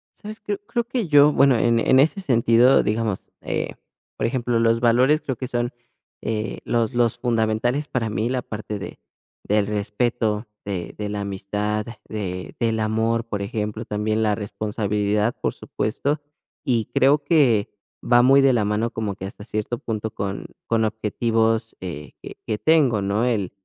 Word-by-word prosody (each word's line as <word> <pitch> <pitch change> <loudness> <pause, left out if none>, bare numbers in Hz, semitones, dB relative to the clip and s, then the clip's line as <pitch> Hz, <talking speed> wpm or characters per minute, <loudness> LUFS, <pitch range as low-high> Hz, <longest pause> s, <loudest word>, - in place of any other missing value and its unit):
Sabes, 215 +1 -9
cre 205 -1 -3
creo 240 -1 0
que 240 -6 -2
yo, 145 -1 +6
bueno, 135 -3 +5
en 115 +1 +3
en 130 +3 +4
ese 160 +8 +3
sentido, 120 -3 +4
digamos, 110 -2 -1 0.2
eh, - - -3 0.4
por - - 0
ejemplo, 120 -1 0
los 115 0 +3
valores 125 +6 +4
creo 130 - -3
que 130 - -5
son, 120 -1 -1 0.5
eh, 110 -1 -3
los 115 0 0
los 120 -2 +2
fundamentales 120 +4 0
para 115 -3 -1
mí, 110 +3 -1
la 130 -1 -1
parte 105 -1 -5
de 100 - -8 0.4
del 105 0 +2
respeto, 105 +1 -1 0.2
de 95 -4 -4
de 105 -1 -3
la 105 0 -3
amistad, 105 +2 -2 0.2
de 95 -4 -5
del 115 -1 +1
amor, 110 +1 0
por 105 -3 -3
ejemplo, 105 +2 -3
también 110 +1 -1
la 105 -2 +2
responsabilidad, 105 +1 -1
por - - 0
supuesto, 140 +7 -2 0.4
y 120 -6 +1
creo 140 +2 +4
que 135 -10 +3 0.3
va 120 0 +5
muy 135 +2 +6
de 135 -1 +5
la 110 -4 +2
mano 105 +3 0
como 105 -3 -3
que 95 - -7
hasta 100 +1 -9
cierto 110 +2 -3
punto 110 -1 -3
con 100 0 -4 0.2
con 115 -1 +2
objetivos, 110 +1 0
eh, 80 -5 -6
que - - -9
que 105 -1 -2
tengo, 145 -9 +3
¿no?, 100 +4 0
el, 105 -7 0
115 Hz, 165 wpm, -23 LUFS, 105-125 Hz, 0.5 s, yo